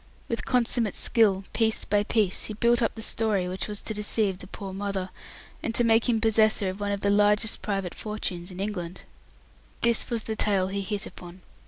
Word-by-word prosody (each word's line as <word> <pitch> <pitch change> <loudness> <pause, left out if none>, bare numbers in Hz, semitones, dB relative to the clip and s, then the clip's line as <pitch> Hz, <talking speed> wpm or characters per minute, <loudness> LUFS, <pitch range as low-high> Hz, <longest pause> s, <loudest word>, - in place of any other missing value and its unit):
With 230 - -2
consummate 240 -3 +1
skill, 200 -4 +2
piece 220 -1 +1
by 205 0 +2
piece 205 -2 +1
he 215 - -5
built 235 +3 +3
up 225 - 0
the 225 - -6
story 210 -6 0
which 185 +1 -3
was 210 -1 -5
to 220 - -4
deceive 210 -2 +2
the 185 - -10
poor 195 0 -7
mother, 195 -1 -3 0.5
and 230 - -3
to 240 - +3
make 225 +1 +3
him 230 -2 +2
possessor 220 -3 +3
of 190 +2 -6
one 205 0 -2
of 200 -1 -2
the 200 - +2
largest 210 +1 +3
private 195 -4 -3
fortunes 190 -4 -4
in 185 0 -8
England. 185 -3 -4 0.8
This 235 -1 +2
was 230 -3 -2
the 220 - -2
tale 195 -4 +1
he 200 +1 -2
hit 200 +1 -3
upon. 175 +1 -11
205 Hz, 200 wpm, -26 LUFS, 190-225 Hz, 0.8 s, built